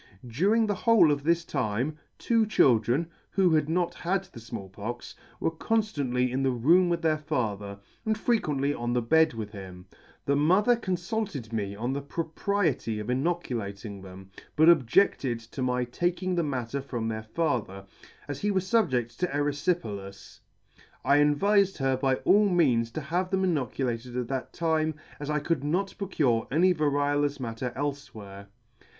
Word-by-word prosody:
During 200 - +2
the 205 - 0
whole 205 -7 +4
of 145 -1 -1
this 170 +2 +1
time, 130 +2 -1 0.2
two 225 -2 +2
children, 125 - +3 0.2
who 190 -3 +2
had 155 -1 +2
not 175 +1 0
had 190 +2 -1
the 180 - -13
Small 115 -3 -7
Pox, 110 +5 -7 0.3
were 165 - 0
conftantly 145 - 0
in 130 +2 -1
the 135 - +2
room 165 +9 +4
with 170 -1 -1
their 155 -1 +2
father, 105 -10 -3 0.3
and 220 -1 0
frequently 150 - 0
on 120 -2 -3
the 125 - +1
bed 160 +2 +3
with 110 -2 -5
him. 95 -3 -10 0.4
The 140 - +2
mother 185 +11 +4
confulted 180 - -3
me 100 -3 -2
on 120 +5 -2
the 140 - -3
propriety 160 - -1
of 105 +4 -3
inoculating 115 - -3
them, 95 0 -12 0.2
but 160 +2 +6
objeded 135 - +3
to 115 +4 -8
my 125 -1 +1
taking 175 +8 -1
the 175 - +1
matter 135 -3 -3
from 120 -4 -4
their 110 -1 -3
father, 110 - -2 0.4
as 145 -1 -5
he 205 - 0
was 190 -2 0
fubjed 130 - +1
to 180 - +1
eryfi 145 +3 0
pelas. 100 - -9 0.7
I 140 +2 +5
advifed 195 +7 +3
her 135 -1 +1
by 130 0 +1
all 205 0 +5
means 130 -11 +2
to 155 - -3
have 175 +5 -1
them 190 0 0
inoculated 125 -6 -2
at 125 -2 -3
that 135 -1 -3
time, 160 -2 0 0.2
as 145 0 -5
I 150 - +1
could 150 -1 -1
not 180 +7 -1
procure 145 - 0
any 180 +6 +4
variolous 145 -2 0
matter 120 0 -4
elfe 145 +1 -3
where. 100 -1 -10
145 Hz, 165 wpm, -27 LUFS, 120-175 Hz, 0.7 s, but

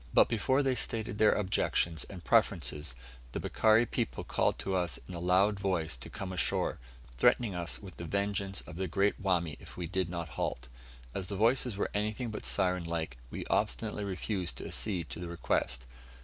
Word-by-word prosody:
But - - +7
before 130 +5 +2
they 135 -1 +2
stated 110 -3 -2
their 110 -1 +6
objections 85 -4 +1
and 90 -3 -9
preferences, 75 - +2 0.4
the - - -2
Bikari 110 +1 +4
people 60 - -2
called - - +1
to 95 - -2
us 90 -4 0
in 90 - -7
a 85 - -4
loud 95 +4 +3
voice 90 -8 0
to - - -8
come 95 -1 -5
ashore, 90 - +1 0.4
threatening 120 - +4
us 85 -1 -1
with 95 -3 -9
the 85 - -5
vengeance 100 +1 0
of - - -10
the 95 0 -1
great 100 +4 +1
Wami 85 -6 +1
if - - -12
we 90 - -2
did 95 +1 -1
not 85 -2 -4
halt. 60 -4 -3 0.4
As 95 -2 -3
the 100 - -3
voices 115 +1 +2
were - - -1
anything 110 +3 -1
but 105 - -3
siren 90 -1 +2
like, 80 -6 -3
we - - -5
obstinately - - 0
refused 95 -1 -2
to - - -5
accede 90 -7 -1
to - - -5
the 90 -1 -5
request. 65 -6 -1
95 Hz, 190 wpm, -32 LUFS, 85-105 Hz, 0.4 s, But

